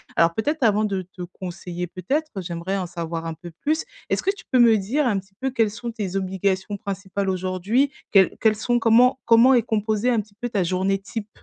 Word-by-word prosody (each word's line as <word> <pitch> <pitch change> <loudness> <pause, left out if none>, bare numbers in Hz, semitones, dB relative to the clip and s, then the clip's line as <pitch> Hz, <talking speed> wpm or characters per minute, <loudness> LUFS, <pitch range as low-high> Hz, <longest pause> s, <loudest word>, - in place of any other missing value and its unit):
Alors 165 0 +4
peut-être 295 - -1
avant 215 -1 +3
de 195 -3 -2
te 180 0 -13
conseiller, 180 0 -6
peut-être 280 - -2
j'aimerais 175 +2 -3
en 185 -2 -3
savoir 165 -1 -5
un 165 - -4
peu 170 +1 -11
plus. 310 +2 0 0.3
Est-ce - - 0
que 390 - +2
tu - - -14
peux 255 - +4
me 230 -2 +7
dire 255 +9 0
un 210 -5 +1
petit 195 0 -17
peu 265 0 -1
quelles 225 -4 +2
sont 235 +3 -6
tes 205 -5 -4
obligations 190 +1 -1
principales 195 0 -3
aujourd'hui? 190 +9 0 0.2
Quels 195 -2 +5
quels 220 -1 +3
sont 240 +2 0
comment 245 +4 +4
comment 235 +3 +6
est 240 - +5
composée 220 +1 0
un 235 - +2
petit 205 0 -19
peu 245 - -2
ta 200 -4 0
journée 190 +2 0
type? 210 +1 -6
200 Hz, 215 wpm, -23 LUFS, 185-235 Hz, 0.3 s, me